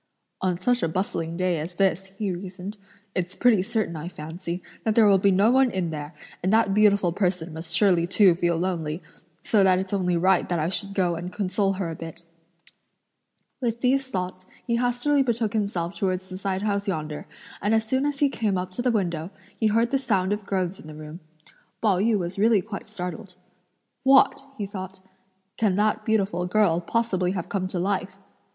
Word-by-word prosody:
"On 180 -2 0
such 245 +5 +1
a - - +1
bustling 165 -2 -2
day 180 -3 +1
as 170 +4 -6
this," 190 0 +1
he 205 -2 -1
reasoned, 185 +2 -6 0.4
"it's 180 0 -2
pretty 240 -6 +4
certain, 215 -4 -2
I 155 +2 -5
fancy, 170 +2 -6 0.2
that 220 -1 +1
there 225 - +6
will 200 -2 +5
be 200 - +4
no 200 +4 +4
one 265 0 +4
in 185 -6 -2
there; 150 0 -6 0.3
and 185 - +1
that 220 -2 +3
beautiful 200 -3 +4
person 175 -3 -1
must 160 +1 0
surely 180 -5 +3
too 190 0 +5
feel 170 -1 0
lonely, 165 -2 -2 0.4
so 210 -3 +3
that 185 -1 +5
it's 190 +1 -3
only 180 -3 +1
right 185 +2 +3
that 175 - +1
I 160 +1 0
should 195 +1 -3
go 180 -3 +2
and 175 +2 -5
console 195 0 0
her 185 -3 -3
a - - -5
bit." 165 +1 -9 1.4
With 235 -1 -1
these 270 +1 +2
thoughts, 185 -5 -4 0.2
he 235 -1 +1
hastily 245 +4 +2
betook 235 -4 0
himself 200 -5 -1
towards 185 -1 -2
the 185 - -6
side 190 0 -2
house 200 -1 -1
yonder, 155 -5 -3 0.3
and 210 +3 +2
as 220 0 +1
soon 260 +5 +1
as 290 -1 -3
he 290 - +6
came 215 -7 -1
up 180 0 -3
to 215 - -4
the 250 - +2
window, 175 -7 -1 0.3
he 220 - +1
heard 230 +3 +2
the 270 - +2
sound 200 -7 +1
of 210 -1 -5
groans 185 -1 -1
in - - -12
the 155 - -9
room. 155 +2 -9 0.6
Pao 200 -5 +2
yü 220 +2 +3
was 180 +1 -4
really 215 -2 +4
quite 210 -1 -7
startled. 185 -1 -6 0.7
"What!" 270 +1 +5 0.2
(he 205 - -2
thought), 190 -1 -7 0.6
"can 210 -4 +2
that 210 +2 +1
beautiful 195 -5 +1
girl, 180 -3 +3
possibly, 185 -2 0
have 180 -4 -4
come 190 -2 -1
to 185 - -4
life!" 190 +1 -1
190 Hz, 200 wpm, -25 LUFS, 175-215 Hz, 1.4 s, there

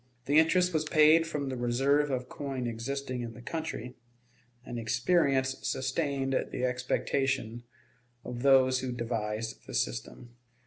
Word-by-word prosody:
The 145 +3 +5
interest 180 +2 +3
was 155 -1 +1
paid 155 +1 +5
from 145 -4 -3
the 130 - -3
reserve 135 +5 +2
of 125 -2 -2
coin 135 -3 -4
existing 125 +2 -3
in 115 -2 -6
the 120 - -11
country, 155 -5 -5 0.7
and 120 - -5
experience 130 +3 +2
sustained 135 0 -1 0.2
the 125 - -1
expectations 125 -1 -1 0.6
of 120 -1 -6
those 130 -1 +5
who 130 -1 -3
devised 115 -2 -4
the - - -6
system. 90 - -3
130 Hz, 135 wpm, -30 LUFS, 120-140 Hz, 0.7 s, The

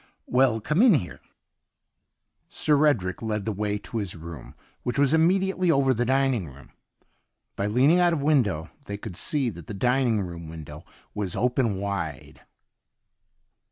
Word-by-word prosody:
•^ - - -31 0.2
Well, 125 -3 +2
come 150 - +1
in 240 -7 +6
here.' 105 -12 -3 1.3
Sir 150 0 +3
Edric 95 -11 0
led 105 -3 -2
the 110 - -1
way 105 0 -2
to 115 +2 -5
his 100 -4 -4
room, 80 -1 -10 0.3
which 125 - -3
was 140 +1 +3
immediately 185 +2 +2
over 135 -4 +3
the 120 0 -1
dining 130 -7 +1
room. 70 0 -14 0.8
By 100 - -1
leaning 135 +11 +4
out 175 -1 +4
of 165 - 0
window 120 - +1 0.2
they 100 - -4
could 100 -3 -8
see 135 - 0
that 85 -5 -12
the 105 - -6
dining 125 0 +1
rooin 85 -2 -8
window 75 -1 -10 0.3
was 100 -4 -3
open 125 -3 +1
wide. 95 -7 -5
115 Hz, 160 wpm, -25 LUFS, 95-140 Hz, 1.3 s, in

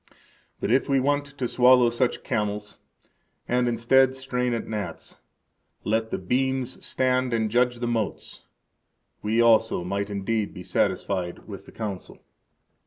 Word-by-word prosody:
But - - -1
if 135 +3 +2
we 135 -1 +3
want 145 +2 +1
to 130 -3 -1
swallow 125 -1 +5
such 120 +1 0
camels, 105 0 -3 0.7
and, 125 0 +1
instead, 130 +3 +3
strain 125 -2 -2
at 115 - -5
gnats, 105 -2 -6 0.6
let 110 +1 0
the - - -2
beams 130 +5 -1
stand 130 -1 +1
and 110 -2 0
judge 125 +1 +2
the 120 0 -3
motes, 115 -3 -4 0.7
we 110 +2 0
also 115 -5 +4
might 100 +3 -2
indeed 105 +1 -2
be 90 - -8
satisfied 90 -1 -1
with - - -9
the - - -12
Council. 100 -5 -6
115 Hz, 140 wpm, -25 LUFS, 105-125 Hz, 0.7 s, swallow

